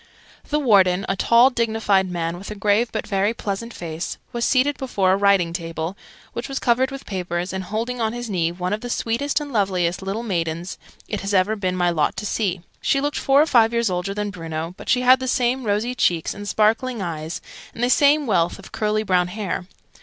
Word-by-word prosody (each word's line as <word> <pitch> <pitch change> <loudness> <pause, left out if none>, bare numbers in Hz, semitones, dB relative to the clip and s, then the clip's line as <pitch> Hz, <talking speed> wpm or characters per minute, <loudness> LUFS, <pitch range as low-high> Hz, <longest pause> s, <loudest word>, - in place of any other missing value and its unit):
The 300 - +1
Warden, 195 -8 +4
a 195 - 0
tall 235 +6 +5
dignified 220 -5 +1
man 170 -1 -3
with 195 - -8
a 210 - -5
grave 210 +3 +1
but - - -3
very 200 +2 0
pleasant 210 +3 -4
face, 165 -4 -5 0.2
was 235 0 -2
seated 280 +3 +2
before 200 -8 +1
a - - +4
writing 195 -4 +3
table, 165 +1 -4 0.4
which 235 - -5
was 270 - -3
covered 255 +2 +2
with 275 0 -8
papers, 180 -1 -3
and 190 -1 -4
holding 230 +4 -3
on 220 -1 +1
his 240 0 -5
knee 170 -5 0
one 180 +2 -3
of 215 - -3
the 245 - -6
sweetest 240 +6 0
and 290 -2 -7
loveliest 185 -5 0
little 195 +4 -3
maidens 170 -4 -3 0.3
it 210 - -3
has 200 +1 -1
ever 190 +3 +3
been 185 -3 -2
my 175 -1 +2
lot 155 -3 0
to 210 - -4
see. 195 -4 -1 0.2
She 275 - +2
looked 290 +1 -1
four 275 +2 +4
or - - +1
five 235 -6 +4
years 235 -4 +1
older 180 +2 -2
than 205 0 -2
Bruno, 165 -2 -5
but - - -10
she 250 - +3
had 255 +1 +6
the 260 - -4
same 250 0 +1
rosy 215 +4 0
cheeks 170 -9 +1
and 205 0 -8
sparkling 225 +4 +1
eyes, 165 -3 -4 0.4
and 235 - -3
the 245 - +3
same 290 +2 +4
wealth 175 -7 +1
of 195 - -13
curly 215 0 0
brown 180 -3 +2
hair. 190 -2 -4
205 Hz, 215 wpm, -22 LUFS, 180-235 Hz, 0.4 s, had